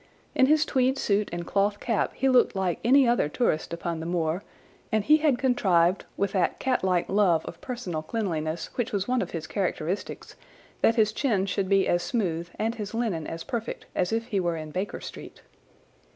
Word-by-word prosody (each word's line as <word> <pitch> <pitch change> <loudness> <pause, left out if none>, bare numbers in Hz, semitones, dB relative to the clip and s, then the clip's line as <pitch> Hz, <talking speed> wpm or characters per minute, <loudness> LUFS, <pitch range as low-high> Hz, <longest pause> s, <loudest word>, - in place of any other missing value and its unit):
In 260 - +4
his 305 +1 +4
tweed 260 -1 +1
suit 205 -4 +1
and 175 0 -4
cloth 205 +2 +1
cap 230 -3 0
he 270 - +1
looked 255 -5 +4
like 190 -3 -1
any 260 +3 +5
other 235 -11 +2
tourist 160 -5 0
upon 170 -1 -3
the 160 - -5
moor, 170 +1 -1 0.5
and 215 -1 +2
he 305 +6 +6
had 300 -5 +2
contrived, 190 -9 +2
with 200 -1 0
that 190 -3 +1
catlike 190 -9 +1
love 190 -5 +2
of 165 - -9
personal 215 -11 -4
cleanliness 165 -4 -3
which 245 - -2
was 200 -1 -1
one 250 0 +1
of - - -3
his 165 -2 -5
characteristics, 185 0 -3 0.5
that 225 - +4
his 215 -2 +3
chin 215 -9 +1
should 195 0 -1
be 195 -1 +3
as 175 - +2
smooth 175 -8 -2
and 225 +1 0
his 215 -1 -6
linen 210 -10 -1
as 165 0 -5
perfect 235 -1 -4
as 180 - 0
if 230 +1 0
he 200 - 0
were 170 -2 -1
in 155 -1 -7
Baker 185 +5 -3
Street. - - -10
200 Hz, 195 wpm, -26 LUFS, 170-235 Hz, 0.5 s, he